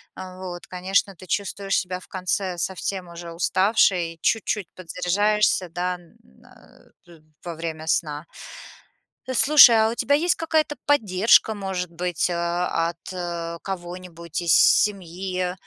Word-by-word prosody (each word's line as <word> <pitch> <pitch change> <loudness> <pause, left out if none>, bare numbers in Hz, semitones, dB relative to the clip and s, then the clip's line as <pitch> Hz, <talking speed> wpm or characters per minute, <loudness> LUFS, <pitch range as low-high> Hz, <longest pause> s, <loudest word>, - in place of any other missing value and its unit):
А, 185 -1 -9
вот, 180 -2 -7
конечно, 190 +2 -1
ты 185 - -13
чувствуешь 195 +2 -2
себя 180 -1 -5
в - - -17
конце 185 0 -2
совсем 185 +1 -3
уже 170 0 -9
уставшей, 180 -1 +1
чуть-чуть 210 -4 0
подзаряжаешься, 185 +2 0
да, 180 +2 -2
н 175 -2 -18 0.3
а, 170 -2 -20 0.2
во 170 -2 -5
время 160 -1 -6
сна. 150 -1 -1 1.1
Слушай, 275 -2 +8
а - - +2
у 230 - -2
тебя 285 +4 +2
есть 340 +4 +2
какая-то 315 -3 0
поддержка, 220 -5 +4
может 190 -3 -4
быть, 175 0 -1
э, - - -1
от, 170 -1 -1 0.2
э, 170 -2 -5
кого-нибудь 175 -2 -6
из 170 -2 +3
семьи? 185 -2 +2
180 Hz, 130 wpm, -23 LUFS, 170-195 Hz, 1.1 s, Слушай